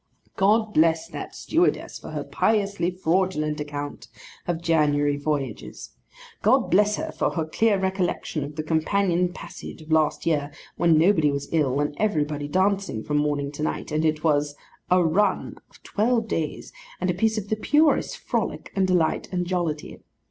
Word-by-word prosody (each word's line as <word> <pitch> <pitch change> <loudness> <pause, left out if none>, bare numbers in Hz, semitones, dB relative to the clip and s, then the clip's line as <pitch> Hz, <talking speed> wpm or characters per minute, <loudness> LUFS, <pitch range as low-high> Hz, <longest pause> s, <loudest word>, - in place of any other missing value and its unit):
God 215 +2 +2
bless 160 +1 +3
that - - -7
stewardess 345 +3 0
for - - -9
her - - -4
piously 200 -5 0
fraudulent 175 -4 0
account 145 -1 -5 0.4
of 175 -2 -1
January 150 -3 +2
voyages! 145 -5 -4 0.5
God - - +3
bless 210 +3 +4
her - - -4
for - - 0
her 160 -2 -2
clear 205 +6 +2
recollection 190 -5 -1
of 145 +1 -7
the 155 - -3
companion 175 +3 +1
passage - - -9
of 155 - -11
last 155 -1 +2
year, 150 -3 0 0.2
when 165 -1 +4
nobody 160 -2 +4
was 140 0 -4
ill, 145 -4 +1
and 145 0 0
everybody 150 -8 0
dancing 190 - 0
from 150 - -1
morning 145 -1 0
to 150 - -8
night, 155 - -3
and 155 +1 0
it 155 -1 0
was 145 -2 +1 0.3
'a 180 0 +4
run' 190 +4 +1
of - - -22
twelve 225 +1 +1
days, 160 -7 -3 0.3
and 180 0 +1
a - - -2
piece 220 +5 +1
of 205 -1 -4
the 215 - +1
purest 295 +8 +2
frolic, - - -3
and 190 -1 +2
delight, 175 -4 +1
and 180 -1 -1
jollity! 175 -4 -3
165 Hz, 165 wpm, -24 LUFS, 150-195 Hz, 0.5 s, bless